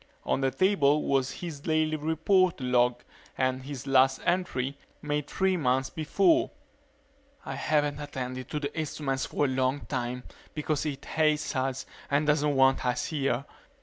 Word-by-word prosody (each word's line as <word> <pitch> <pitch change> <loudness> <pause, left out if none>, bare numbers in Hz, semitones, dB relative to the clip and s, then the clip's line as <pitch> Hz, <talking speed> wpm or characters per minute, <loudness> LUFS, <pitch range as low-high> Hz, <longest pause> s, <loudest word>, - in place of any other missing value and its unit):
On - - 0
the 135 - +2
table 150 -4 +3
was 135 -1 +1
his 165 -5 -6
daily 155 +1 +1
report 160 +4 +2
log 125 -1 +2 0.3
and 130 0 0
his 135 -2 -7
last 135 0 +4
entry, 155 -7 0 0.2
made 150 -1 -2
three 190 -1 +1
months 130 -3 +1
before: 325 - +2 1.0
_I - - -4
haven't 145 -2 0
attended 130 -3 -5
to 150 - -2
the 145 -1 -4
instruments 145 -4 -2
for 145 - 0
a - - +2
long 130 +1 0
time 125 +1 -3 0.3
because 155 0 -1
it 140 -2 -5
hates 155 -2 +1
us 130 0 -1 0.2
and 145 +2 +2
doesn't 150 -1 +2
want 135 0 +4
us 125 -1 0
here. 140 -3 -1
140 Hz, 150 wpm, -28 LUFS, 130-155 Hz, 1.0 s, last